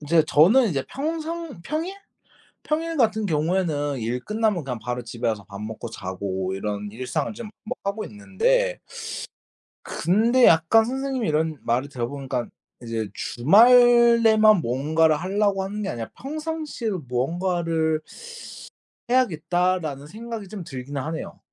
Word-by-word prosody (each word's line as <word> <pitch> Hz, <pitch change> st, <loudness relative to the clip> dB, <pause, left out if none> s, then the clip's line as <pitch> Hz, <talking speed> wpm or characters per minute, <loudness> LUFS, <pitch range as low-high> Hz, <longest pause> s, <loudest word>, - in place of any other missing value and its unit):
인제 155 Hz, +1 st, +3 dB
저는 210 Hz, -, +5 dB
이제 140 Hz, -7 st, -1 dB
평상 320 Hz, -, -4 dB
평일, 320 Hz, -, -3 dB, 0.7 s
평일 325 Hz, +2 st, -2 dB
같은 220 Hz, -5 st, +2 dB
경우에는 155 Hz, -4 st, 0 dB
일 120 Hz, +2 st, -2 dB
끝나면 210 Hz, -6 st, 0 dB
그냥 125 Hz, -3 st, -4 dB
바로 125 Hz, +3 st, -4 dB
집에 115 Hz, +1 st, -5 dB
와서 105 Hz, -3 st, -2 dB
밥 100 Hz, -1 st, -8 dB
먹고 110 Hz, +2 st, -6 dB
자고 95 Hz, 0 st, -4 dB
이런 105 Hz, +1 st, -4 dB
일상을 130 Hz, +6 st, -3 dB
좀 225 Hz, -1 st, -8 dB
뭐 215 Hz, -, -3 dB
하고 200 Hz, +2 st, -2 dB
있는데 -, -, 0 dB, 1.0 s
근데 230 Hz, +8 st, +2 dB
약간 165 Hz, +8 st, +5 dB
선생님의 260 Hz, -1 st, -2 dB
이런 155 Hz, 0 st, 0 dB
말을 125 Hz, +4 st, 0 dB
들어 125 Hz, -4 st, -3 dB
보니깐 135 Hz, -3 st, -4 dB, 0.3 s
이제 115 Hz, -2 st, -3 dB
주말에만 230 Hz, -, +6 dB
뭔가를 155 Hz, +5 st, +2 dB
하려고 195 Hz, +3 st, 0 dB
하는 205 Hz, +2 st, -4 dB
게 -, -, -3 dB
아니라 115 Hz, -2 st, -5 dB
'평상시에도 300 Hz, -, -4 dB
뭔가를 165 Hz, +4 st, 0 dB, 1.1 s
해야겠다.'라는 175 Hz, -, +1 dB
생각이 220 Hz, +3 st, -7 dB
좀 195 Hz, -2 st, -7 dB
들긴 135 Hz, 0 st, -7 dB
하네요. 160 Hz, +4 st, -5 dB
175 Hz, 295 characters per minute, -24 LUFS, -, 1.1 s, 주말에만